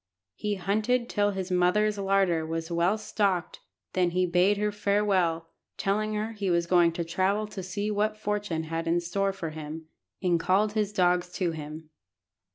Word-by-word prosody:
He 210 - -2
hunted 215 +6 0
till 205 -1 +2
his 190 -2 -4
mother's 200 +4 +2
larder 195 -4 +2
was 165 +1 -4
well 170 +5 +2
stocked, 200 -4 -1 0.3
then 180 -1 +2
he 180 +1 +1
bade 180 +4 +3
her 210 0 0
farewell, 200 -5 +1 0.3
telling 215 +2 0
her 215 +2 -2
he 205 -3 -3
was 170 -1 +2
going 175 -1 +4
to 170 - -2
travel 190 +5 0
to 210 -2 -7
see 205 +3 -3
what 210 +1 0
fortune 205 -6 -2
had 165 +1 -3
in 170 +1 +2
store 195 +3 -1
for 170 -5 -5
him, 155 +1 -8 0.3
and 175 -3 +2
called 190 +5 +2
his 210 -2 0
dogs 180 -2 +2
to 180 -4 0
him. 155 0 -8
185 Hz, 170 wpm, -28 LUFS, 170-205 Hz, 0.3 s, going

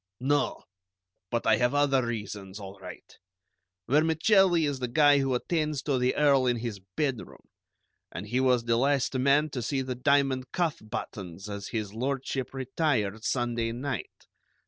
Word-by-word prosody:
"No; 145 +3 0 0.7
but 120 - -2
I 110 -1 +4
have 120 +3 +1
other 140 -2 +3
reasons, 105 -4 -5
all 100 0 -9
right. 95 - -10 0.8
Vermicelli 160 - +4
is 140 -2 -2
the 125 - -2
guy 145 +3 +5
who 135 -2 0
attends 150 +1 -1
to 140 -4 0
the 125 +1 +1
Earl 140 -3 +4
in 120 -1 +2
his 115 -3 -5 0.2
bedroom, 135 -6 -3 0.7
and 90 - -6
he 120 +5 -1
was 125 -2 +3
the 115 0 +1
last 135 +1 +1
man 140 +3 +2
to 125 - -3
see 135 +3 -1
the 130 0 -3
diamond 135 0 +1
cuff 170 -3 -1
buttons 95 -3 -6
as 100 -1 -6
His 105 -3 -4
Lordship 130 +2 -3
retired 130 -6 -1
Sunday 120 -2 -1
night. 130 0 -5
130 Hz, 155 wpm, -28 LUFS, 115-145 Hz, 0.8 s, guy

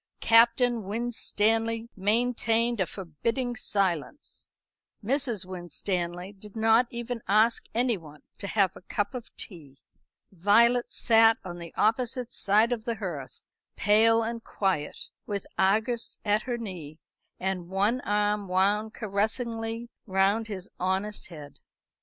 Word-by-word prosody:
Captain 235 +1 +4
Winstanley 225 +1 0
maintained 230 +2 +1
a 185 - +1
forbidding 230 - -3
silence; 195 - -2 0.6
Mrs. 240 -4 0
Winstanley 180 0 -4
did 205 +1 -13
not 225 +2 +4
even 235 0 -5
ask 215 +4 +3
anyone 195 - -1 0.2
to 200 - -4
have 195 -3 +2
a - - -12
cup 200 +2 -2
of 245 -3 -7
tea; 150 - -7 0.5
Violet 230 +7 +3
sat 225 -1 +5
on 175 -1 -6
the 170 -1 -8
opposite 245 +2 0
side 215 +4 +3
of 230 -2 -2
the 235 - -1
hearth, 175 -11 -6 0.3
pale 225 +2 +4
and 230 0 -4
quiet, 185 -7 -1 0.3
with 200 -2 -3
Argus 220 +5 +1
at 210 +1 +2
her 240 - 0
knee, 175 -9 -7 0.4
and 185 -2 -3
one 205 +6 +1
arm 210 0 0
wound 205 +4 +1
caressingly 225 +2 -2 0.2
round 195 +3 +2
his 190 -4 -6
honest 190 +3 -1
head. 150 -5 -11
210 Hz, 125 wpm, -27 LUFS, 190-230 Hz, 0.6 s, sat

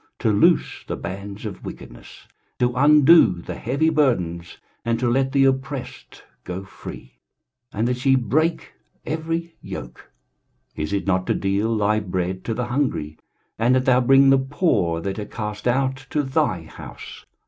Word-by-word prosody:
to - - +1
loose - - +2
the - - -3
bands 100 +4 -7
of 105 - -7
wickedness, - - -11 0.3
to 125 0 +1
undo 150 - +6
the - - -7
heavy 140 +7 0
burdens, 90 - 0 0.3
and 115 0 0
to 125 - 0
let 135 +2 +1
the 135 -1 +4
oppressed 135 0 -3 0.2
go 90 +2 -5
free, 80 - -11 0.5
and 110 +3 -1
that 125 0 -2
ye 135 -1 +5
break 155 +6 0 0.3
every 165 +1 -3
yoke? - - -9 0.7
23:058:007 - - -3
Is 90 - -5
it 100 - -1
not 95 -1 0
to - - +1
deal 100 +4 0
thy 105 +1 +2
bread 95 -2 -3
to 115 - -2
the 125 +1 -2
hungry, 120 - -2 0.4
and 120 +3 +3
that 130 0 +1
thou 130 -1 +4
bring 135 +2 +6
the 135 - +5
poor 130 - 0
that 95 +4 -4
are - - -3
cast 105 0 -5
out 135 +1 0
to 150 - 0
thy 135 - 0
house? 80 - -11
120 Hz, 165 wpm, -22 LUFS, 100-135 Hz, 0.7 s, undo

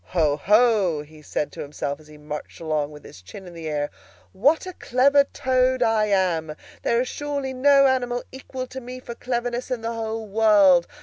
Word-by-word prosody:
"Ho, 155 -5 +1
ho!" 200 -3 +3
he 155 +1 -16
said 150 0 -3
to - - -8
himself 145 0 -4
as 155 - -18
he 150 0 -14
marched 150 0 -8
along 155 -3 -1
with 150 -1 -13
his 90 - -13
chin 190 - -11
in 175 - -11
the 165 -2 -6
air, 145 -1 -2 0.4
"what 290 - +2
a 370 - -6
clever 280 0 +3
Toad 255 -2 +1
I 225 -2 +2
am! 175 -6 0 0.3
There 235 +1 +1
is 255 - -2
surely 285 -2 -4
no 275 +1 +5
animal 245 -2 +1
equal 260 0 -6
to 260 +1 -8
me 250 +1 -8
for 240 - -8
cleverness 245 0 -3
in 250 -3 -2
the 230 +1 -3
whole 225 -1 -4
world! 200 -4 +5
225 Hz, 195 wpm, -23 LUFS, 160-255 Hz, 0.4 s, no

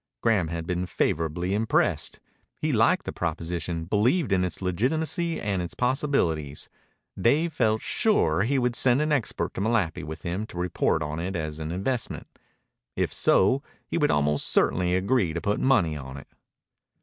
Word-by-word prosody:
Graham 110 -8 +2
had 85 0 -4
been 90 +1 -2
favorably 85 +2 -1
impressed. 110 +2 0 0.4
He - - 0
liked - - +3
the - - -3
proposition, 85 0 -3
believed 115 - +1
in 95 -1 +3
its 90 - -3
legitimacy 155 - 0
and 100 -3 -1
its 85 - -5
possibilities. 125 - 0 0.5
Dave 155 +7 +2
felt 110 -5 +1
sure 150 - +2
he 130 +7 +1
would 125 -2 +1
send 125 +1 +4
an 155 - -1
expert 135 -6 -1
to - - -4
Malapi 105 -6 0
with 80 0 -7
him 95 +5 -3
to 90 - -11
report 90 -3 0
on 75 +2 -4
it 95 +3 -3
as 75 -2 -4
an 80 +1 -4
investment. 110 +8 -2 0.7
If - - -1
so, 130 +9 +3 0.2
he - - -2
would 150 - +3
almost 75 0 +1
certainly 90 0 +2
agree 95 -2 +1
to 85 - -2
put 100 +4 -1
money 110 -12 +3
in 70 -2 -7
it. 70 - -11
95 Hz, 165 wpm, -26 LUFS, 85-125 Hz, 0.7 s, send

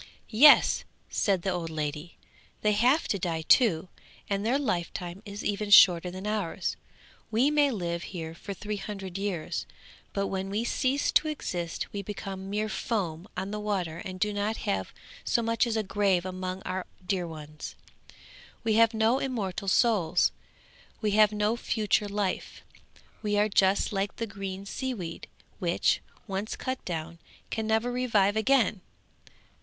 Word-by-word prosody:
'Yes,' 275 +7 +7 0.3
said 195 -4 +1
the 195 - 0
old 175 -2 -3
lady, 155 +1 -4 0.4
'they 210 - +3
have 245 +9 +3
to 200 - 0
die 165 -2 -2
too, 185 - +4 0.4
and 200 0 -1
their 240 +5 +2
lifetime 180 -6 -3
is 205 +1 -6
even 205 0 -1
shorter 180 -3 +8
than 185 +2 -7
ours. 195 -4 -2 0.5
We 240 +6 +3
may 295 -1 +4
live 170 -7 -2
here 165 -3 -6
for 195 +4 -7
three 210 +2 -4
hundred 195 -2 -6
years, 195 -5 -3 0.4
but 200 0 -1
when 195 0 -3
we 210 +3 -1
cease 260 +3 +1
to 310 - +3
exist 175 - -3
we 200 - -3
become 195 -1 -6
mere 210 +2 -1
foam 190 -4 -2
on 195 - -3
the 210 - -3
water 185 -6 -2
and 185 -2 -7
do 210 +1 +1
not 205 +2 -1
have 95 -1 -1 0.3
so 235 - +1
much 230 +1 +2
as 225 -1 0
a 220 - +1
grave 190 -2 +1
among 185 0 -4
our 185 0 -3 0.2
dear 180 -2 -1
ones. 155 -2 -8 0.9
We 225 -1 +2
have 230 0 +5
no 225 +4 +3
immortal 205 -7 -3
souls; 190 -5 +3 0.7
we 215 -2 0
have 215 0 +5
no 210 +1 +1
future 210 -3 0
life; 200 -2 -3 0.6
we 210 -1 0
are 210 +1 +4
just 195 0 +3
like 195 0 -1
the 230 - -3
green 195 -2 -6
sea 260 +5 -3
weed, 170 -5 -6 0.3
which, - - +2 0.2
once 200 +1 -3
cut 260 0 -4
down, 165 -1 -4 0.3
can 220 -1 -2
never 220 +2 +1
revive 220 -5 +2
again! 220 -3 +3
200 Hz, 160 wpm, -28 LUFS, 185-220 Hz, 0.9 s, shorter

